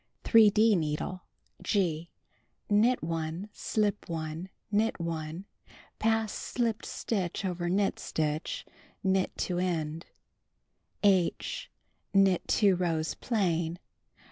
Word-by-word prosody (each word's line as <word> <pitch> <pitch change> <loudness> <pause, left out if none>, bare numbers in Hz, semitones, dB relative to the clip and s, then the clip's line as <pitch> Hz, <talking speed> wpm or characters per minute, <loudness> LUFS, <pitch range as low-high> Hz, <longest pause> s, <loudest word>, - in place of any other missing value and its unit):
3d 220 -1 +6
needle 160 +2 -2 0.2
— - - -28
(G) 170 -5 0 0.6
Knit 220 +3 +3
1, 165 +4 -3
slip 210 -3 -1
1, 160 +2 -4 0.2
knit 215 0 +1
1, 165 +1 -4 0.5
pass 225 -1 +1
slipped 230 -3 -2
stitch 195 -3 -2
over 175 -2 -2
knit 195 +2 +1
stitch, 155 0 -2 0.4
knit 190 -1 +1
to 180 -1 -1
end. 165 -3 -2 1.0
(H) 190 -4 +2 0.5
Knit 195 -2 +5
2 200 -3 +4
rows 165 -3 0
plain. 175 -7 0
180 Hz, 100 wpm, -30 LUFS, 165-205 Hz, 1.0 s, 3d